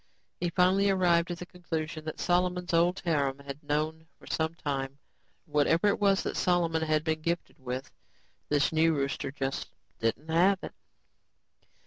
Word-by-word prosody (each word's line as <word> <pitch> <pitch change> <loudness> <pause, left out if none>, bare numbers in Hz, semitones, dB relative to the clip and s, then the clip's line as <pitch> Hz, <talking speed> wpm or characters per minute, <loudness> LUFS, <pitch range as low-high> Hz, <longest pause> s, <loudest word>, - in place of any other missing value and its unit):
He 175 - 0
finally 185 +3 +3
arrived 175 -3 +3
at 175 - -3
the 180 - -7
conclusion 160 -3 -5
that 155 - -5
Solomon's 180 0 +1
old 175 +3 +3
harem 140 -5 +1
had 140 +1 -8
known 155 +2 -2
for - - -17
some 160 +1 -1
time; 140 -4 -3 0.5
whatever 155 +3 +2
it - - 0
was 200 -1 +3
that - - -3
Solomon 170 -3 +2
had 155 -1 +1
been 160 -1 -1
gifted 170 +2 -3
with, 130 +1 -5 0.6
this 145 -1 +2
new 160 0 +4
rooster 140 -1 -2
just 135 -1 -3 0.3
didn't 115 +7 -1
have 180 +5 +4
it. - - -6
160 Hz, 155 wpm, -29 LUFS, 145-175 Hz, 0.6 s, new